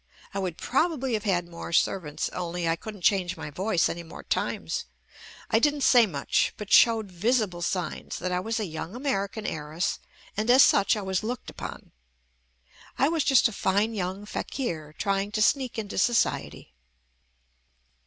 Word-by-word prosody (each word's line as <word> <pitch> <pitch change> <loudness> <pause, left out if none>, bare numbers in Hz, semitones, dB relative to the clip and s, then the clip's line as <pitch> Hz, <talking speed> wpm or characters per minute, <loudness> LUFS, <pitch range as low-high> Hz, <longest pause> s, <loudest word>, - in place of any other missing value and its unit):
I 200 - -2
would 180 -4 -3
probably 270 -3 0
have 215 -1 -1
had 175 -4 +1
more 170 0 -8
servants 160 -2 0
only 175 -1 -3
I 165 - +2
couldn't 205 +1 -9
change 185 -3 +2
my 150 - -6
voice 185 +3 +1
any 170 - -4
more 165 - -11
times. - - -2 0.7
I 225 - +5
didn't 290 +3 +2
say 240 -3 +6
much, 140 -7 0
but 210 -1 -8
showed 225 -4 +5
visible 200 -1 0
signs 175 -2 -3
that 180 +1 -3
I 180 - +1
was 225 +5 -2
a 215 - -1
young 165 +3 -6
American 220 -5 -2
heiress 155 +3 -2 0.4
and 215 +3 -1
as 255 +2 +8
such 200 +2 +4
I 210 - -4
was 190 -1 -1
looked 240 +3 -5
upon. - - -8 1.1
I 275 - +3
was 325 -2 +1
just 270 -3 +5
a - - -6
fine 200 +4 +1
young 190 0 -3
fakir 160 - -4
trying 200 0 0
to - - 0
sneak 260 0 +1
into 210 -3 -3
society. 235 - 0
200 Hz, 165 wpm, -27 LUFS, 175-230 Hz, 1.1 s, as